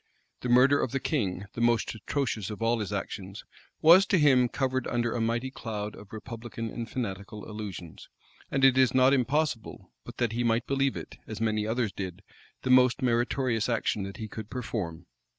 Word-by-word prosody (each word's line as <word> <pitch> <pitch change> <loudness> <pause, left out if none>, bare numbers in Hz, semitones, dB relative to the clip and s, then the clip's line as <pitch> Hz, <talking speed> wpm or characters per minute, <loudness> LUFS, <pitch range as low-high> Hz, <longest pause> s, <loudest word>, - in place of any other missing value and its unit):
The 125 - -4
murder 130 +4 +5
of 125 - -2
the 135 - +1
king, 100 - -1
the 115 - -4
most 120 -1 +2
atrocious 110 -2 -2
of 105 - -6
all 115 +1 +1
his 105 -2 -3
actions, 100 -1 -5 0.4
was 180 +5 +8
to 190 - +3
him 130 -6 +5
covered 130 -1 -1
under 120 -1 0
a 120 - -1
mighty 120 +3 -1
cloud 105 -5 -5
of 105 -1 -13
republican 115 +1 -6
and 115 -2 -5
fanatical 105 -3 -5
illusions; 100 -6 -8 0.4
and 135 0 +3
it 130 0 +5
is 130 -1 +4
not 130 +1 +5
impossible, 135 -2 -1
but 120 - -2
he 120 +2 -1
might 115 +1 +1
believe 135 -1 0
it, - - -9
as 110 - -6
many 110 -1 0
others 115 -2 0
did, 95 0 -6 0.4
the 130 - +1
most 130 +1 +5
meritorious 120 -1 +1
action 115 -3 0
that 100 0 -6
he 110 - -5
could 110 0 -8
perform. 95 -9 -4
115 Hz, 185 wpm, -28 LUFS, 105-130 Hz, 0.4 s, was